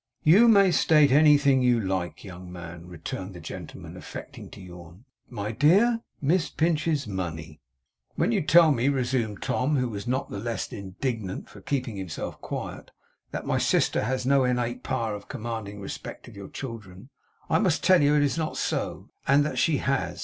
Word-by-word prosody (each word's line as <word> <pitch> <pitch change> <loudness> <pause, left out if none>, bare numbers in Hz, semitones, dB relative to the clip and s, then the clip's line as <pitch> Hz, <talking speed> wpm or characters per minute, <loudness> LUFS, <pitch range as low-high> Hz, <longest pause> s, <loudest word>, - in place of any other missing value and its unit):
'You 195 +10 +7
may 200 -4 +6
state 150 -4 +4
anything 140 -2 +5
you 125 -2 +3
like, 95 -5 -3
young 90 -2 -10
man,' 85 -1 -9
returned 90 +2 -7
the - - -8
gentleman, 80 - -9
affecting - - -9
to - - -12
yawn. 90 +3 -12 0.2
'My 105 -3 -4
dear, 195 - +4 0.2
Miss 160 +4 +1
Pinch's 155 -3 0
money.' 80 -6 -5 0.5
'When - - +1
you 210 -4 +1
tell 165 0 +6
me,' 130 0 +2
resumed 125 -6 -1
Tom, 140 +4 0
who 125 -2 +1
was 105 +1 -6
not 130 +2 -2
the 100 - -4
less 115 +2 -4
indignant 100 0 -4
for - - -13
keeping 130 -6 -3
himself 95 -5 -6
quiet, - - -6 0.4
'that - - -5
my - - 0
sister - - +2
has 130 +1 -2
no 135 0 +4
innate 125 -1 -1
power 115 -5 -2
of 100 -1 -8
commanding 110 -5 -5
the 100 - -10
respect - - -8
of - - -13
your 100 -1 -9
children, 110 -3 -8 0.4
I - - +2
must 185 -8 +1
tell 185 -3 +5
you 145 +1 +4
it 145 - +4
is 145 +3 0
not 155 -1 -3
so; - - -3 0.2
and 145 +1 +4
that 150 - -2
she 160 -4 +2
has. 135 +1 -1
125 Hz, 180 wpm, -26 LUFS, 100-145 Hz, 0.5 s, You